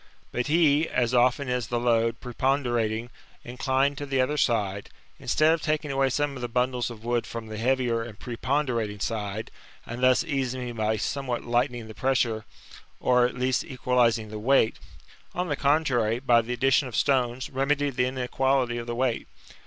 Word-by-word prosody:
But 125 - -2
he, 155 0 +3
as 120 -1 0
often 125 +3 +3
as 125 -1 -1
the 120 - -1
load, 115 -1 +1
preponderating, 120 -3 -1 0.3
inclined 135 +3 0
to 145 - -5
the 135 -1 0
other 130 +4 +1
side, 100 -8 0 0.3
instead 155 +2 +3
of 165 - -2
taking 155 -1 -1
away 135 0 +2
some 145 +2 -1
of 130 - -7
the 120 - -2
bundles 125 0 0
of 115 -2 -10
wood 120 0 -1
from 115 -1 -6
the 110 - -6
heavier 120 -1 +1
and 115 -3 -8
preponderating 120 -4 -2
side, 105 0 -3 0.3
and 120 +2 -6
thus 130 +2 +4
easing 130 -5 -2
me 120 - -4
by 110 -1 -1
somewhat 125 +2 -2
lightening 120 -1 0
the 110 - -9
pressure, 120 -3 0 0.5
or 125 -1 +3
at 125 - -8
least 125 0 +1
equalizing 125 -4 +1
the 105 0 -6
weight, 120 0 +2 0.6
on 180 0 -2
the 145 - 0
contrary, 135 -6 +2
by 120 -2 +4
the 120 +2 -4
addition 135 +3 +2
of 120 - -7
stones, 130 -2 +1
remedied 140 +1 0
the 125 -1 +2
inequality 130 -1 0
of 120 - -7
the 120 - -3
weight. 125 -1 -1
125 Hz, 175 wpm, -26 LUFS, 115-135 Hz, 0.6 s, thus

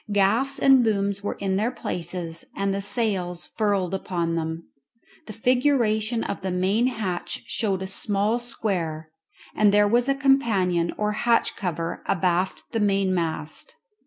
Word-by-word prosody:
Gaffs 220 +8 +2
and 265 -2 +6
booms 200 -2 0
were 205 - -3
in 190 -1 -1
their 220 +4 +1
places, 175 -7 -4
and 195 0 0
the 200 - -2
sails 195 -4 -1
furled 200 -4 -1
upon 175 -3 -2
them. 160 0 -3 0.6
The 215 - -7
figuration 235 -2 +1
of 200 - -4
the 190 - -2
main 190 +6 +2
hatch 200 -8 -3
showed 195 -4 -1
a - - -4
small 205 +4 0
square, 170 -10 -3 0.4
and 210 -1 +4
there 205 0 +5
was 240 +5 +2
a 275 - +3
companion 210 -11 +2
or 210 0 0
hatch 230 +2 +1
cover 170 -4 -3
abaft 180 0 0
the 225 - -1
mainmast. 190 - -1
200 Hz, 145 wpm, -24 LUFS, 180-225 Hz, 0.6 s, and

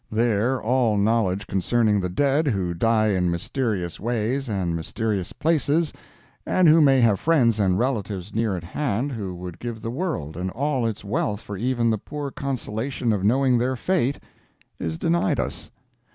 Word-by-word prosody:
There 115 +3 +1
all 120 -2 +2
knowledge 100 -2 +1
concerning 105 +2 +1
the 90 - -2
dead 140 - +1
who 95 -8 0
die 110 +4 +2
in 90 -3 +1
mysterious 90 - -2
ways 120 +4 -1
and 90 -5 -1
mysterious 95 +3 -2
places, 160 0 +1 0.5
and 185 -2 +3
who 160 +1 +7
may 135 -3 +5
have 110 -5 +3
friends 125 -9 +3
and 95 -3 +2
relatives 105 -6 -2
near 110 -4 0
at 85 - -7
hand 125 - -2
who 100 -7 -5
would 90 -1 -8
give 120 -2 -5
the 115 - -3
world 125 - -3
and 90 +2 -3
all 130 +1 -1
its 110 -2 -5
wealth 105 +1 -1
for 100 - -7
even 120 +2 +1
the 110 - -1
poor 145 +4 -6
consolation 125 -2 -2
of 100 -3 -2
knowing 125 +3 +3
their 130 +2 0
fate, 140 -2 0 0.6
is 80 -1 -3
denied 85 +4 +1
us. - - -4
115 Hz, 165 wpm, -24 LUFS, 95-130 Hz, 0.6 s, who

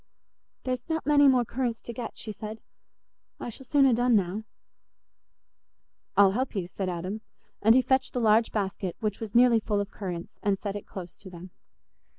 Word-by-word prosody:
"There's 255 +1 -3
not 320 0 -1
many 285 -1 +5
more 255 -3 +4
currants 240 -1 -2
to 235 - -7
get," 245 0 -6
she 215 - -6
said; 215 +1 -7 0.8
"I - - -5
shall 255 +3 -11
soon 280 0 +4
ha' 255 - +4
done 245 0 +3
now." 200 +2 0 1.7
"I'll 200 -1 +7
help 250 +4 -2
you," 185 -3 -2
said 185 +1 -4
Adam; 185 +5 -4 0.4
and 225 +3 +6
he 260 - +5
fetched 260 0 +1
the 250 - -1
large 225 0 +4
basket, 195 -3 -2
which 210 -2 -2
was 220 -1 -7
nearly 240 -1 +6
full 210 -1 -1
of 200 0 -3
currants, 175 -4 -6
and 200 -1 +1
set 200 0 -4
it 205 - -7
close 180 -3 -8
to 205 - -12
them. 180 0 -11
220 Hz, 185 wpm, -27 LUFS, 195-245 Hz, 1.7 s, I'll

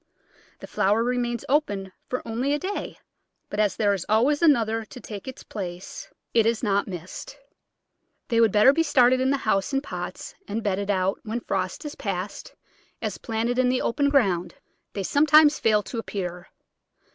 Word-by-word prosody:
The - - -7
flower 210 +4 +1
remains 240 -1 -1
open 205 -10 0 0.2
for 255 - -4
only 245 +5 -1
a - - +2
day, 380 +6 -4 0.5
but 205 - -3
as 205 -3 +2
there 205 -1 +2
is 190 -4 -3
always 255 +8 +3
another 225 -8 +3
to 250 - -12
take 210 -2 -8
its 260 - -8
place 190 - -7 0.2
it 225 -1 +4
is 230 0 0
not 200 -2 +1
missed. 185 - -8 0.9
They 230 -1 +3
would 225 -3 +5
better 215 +7 +6
be 330 - +2
started 255 -4 +4
in 260 - +2
the 280 - +2
house 215 +1 0
in 270 - +2
pots - - -6
and 215 +2 -3
bedded 200 0 -1
out 190 0 +1
when 225 +2 -4
frost 185 - -3
is 295 - -5
past, 195 -1 -5 0.4
as, - - -4
planted 230 +2 -1
in 255 -1 +3
the 255 0 0
open 280 +4 +1
ground, 185 -11 +1 0.4
they 200 - -3
sometimes 300 - +5
fail 210 -2 +3
to 235 - -5
appear. 180 -4 -5
225 Hz, 175 wpm, -25 LUFS, 200-260 Hz, 0.9 s, better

